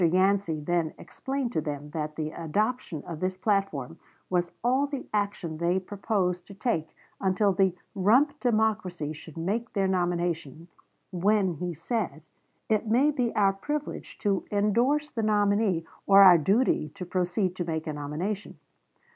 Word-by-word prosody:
Yancey 185 -1 +2
then 165 +1 -1
explained 270 -2 -4
to 160 - +1
them 150 -1 -5
that 150 -1 -4
the 155 -1 -3
adoption 185 - -2
of 165 -3 -6
this 185 +1 -2
platform 195 - -1 0.3
was 175 -1 +1
all 260 +4 +2
the 280 -2 -5
action 200 -6 -1
they 175 +2 +2
proposed 185 -2 -2
to 200 - -11
take 190 -7 -2 0.2
until 195 +1 +2
the 190 -1 +2 0.2
"rump 260 +10 +3
democracy" 215 - 0
should 160 +1 -12
make 220 +9 -2
their 195 -3 +1
nomination, 175 -4 -1 0.4
when, 190 +1 +2
he 175 +3 -4
said, 165 - -3 0.4
"it 220 0 +1
may 255 +7 +4
be 250 -5 0
our 200 -2 +4
privilege 295 +9 -5
to 200 -3 0
indorse 235 +9 +1
the 230 - -2
nominee, 205 -4 +2 0.2
or 200 0 +8
our 180 -3 +9
duty 195 - +2
to 180 - -6
proceed 180 +1 -1
to 180 - -2
make 160 -2 -3
a 155 - -3
nomination." 155 +8 -4
190 Hz, 150 wpm, -27 LUFS, 170-215 Hz, 0.4 s, our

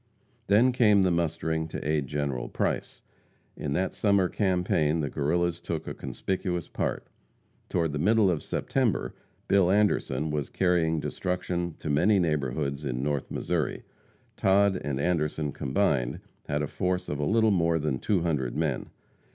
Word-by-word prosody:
Then 110 +6 +5
came 105 -5 +4
the 90 - +3
mustering 80 -1 -1
to 80 - -5
aid 75 -3 0
General 70 -3 -2
Price. - - -2 0.5
In 70 -2 -3
that 95 +5 0
summer 100 -3 +2
campaign 90 -5 +1
the 75 -3 -2
Guerrillas 85 +4 0
took 80 -2 -4
a - - -3
conspicuous 90 -3 -3
part. - - -3 0.6
Toward 85 -3 0
the 75 - -3
middle 105 +3 +4
of 80 - -1
September, 125 -8 -1 0.3
Bill 95 -3 +4
Anderson 80 -8 +1
was 75 -2 -2
carrying 85 -3 +1
destruction 90 0 -3
to - - -8
many 90 +8 +4
neighborhoods 70 -3 -1
in 65 -2 -2
North 75 -2 -1
Missouri. - - -2 0.5
Todd 100 0 +3
and 70 -2 -2
Anderson 75 -2 0
combined, 70 -4 0 0.3
had 75 +1 -1
a - - -1
force 90 +2 -2
of 75 - -3
a - - 0
little 110 +6 +3
more 85 -3 +2
than 75 -5 -1
two 95 - +1
hundred 75 -8 -1
men. 75 -4 -1
80 Hz, 150 wpm, -27 LUFS, 75-95 Hz, 0.6 s, Then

